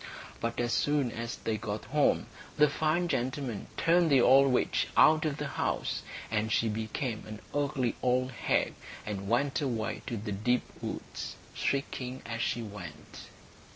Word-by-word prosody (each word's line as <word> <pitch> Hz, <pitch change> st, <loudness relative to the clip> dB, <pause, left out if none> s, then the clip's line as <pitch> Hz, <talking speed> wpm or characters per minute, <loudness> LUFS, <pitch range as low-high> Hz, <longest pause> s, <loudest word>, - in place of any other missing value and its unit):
But 115 Hz, +1 st, -2 dB
as 120 Hz, -1 st, +1 dB
soon 145 Hz, -4 st, +2 dB
as 115 Hz, +1 st, -4 dB
they 110 Hz, -1 st, -2 dB
got 105 Hz, -1 st, -4 dB
home 150 Hz, +1 st, +2 dB, 0.3 s
the 150 Hz, 0 st, +7 dB
fine 160 Hz, +4 st, +1 dB
gentleman 125 Hz, -5 st, -2 dB
turned 170 Hz, 0 st, +4 dB
the 135 Hz, -3 st, +6 dB
old 135 Hz, +2 st, +6 dB
witch 125 Hz, -, +2 dB
out 155 Hz, +1 st, +6 dB
of 150 Hz, -2 st, -1 dB
the 150 Hz, -, -3 dB
house. 140 Hz, -, -1 dB, 0.3 s
And 110 Hz, 0 st, 0 dB
she 115 Hz, +1 st, +2 dB
became 110 Hz, +2 st, -3 dB
an 110 Hz, 0 st, -7 dB
ugly 135 Hz, -4 st, 0 dB
old 130 Hz, +1 st, +2 dB
hag, 120 Hz, -, +1 dB, 0.3 s
and 100 Hz, -2 st, -4 dB
went 135 Hz, +5 st, +2 dB
away 115 Hz, -6 st, -2 dB
to 115 Hz, -, -2 dB
the 105 Hz, +1 st, -4 dB
deep 120 Hz, +5 st, +1 dB, 0.2 s
woods, -, -, -5 dB, 0.2 s
shrieking 130 Hz, -2 st, -2 dB
as 115 Hz, 0 st, -3 dB
she 120 Hz, 0 st, 0 dB
went. 95 Hz, -8 st, -9 dB
125 Hz, 155 wpm, -30 LUFS, 110-140 Hz, 0.3 s, the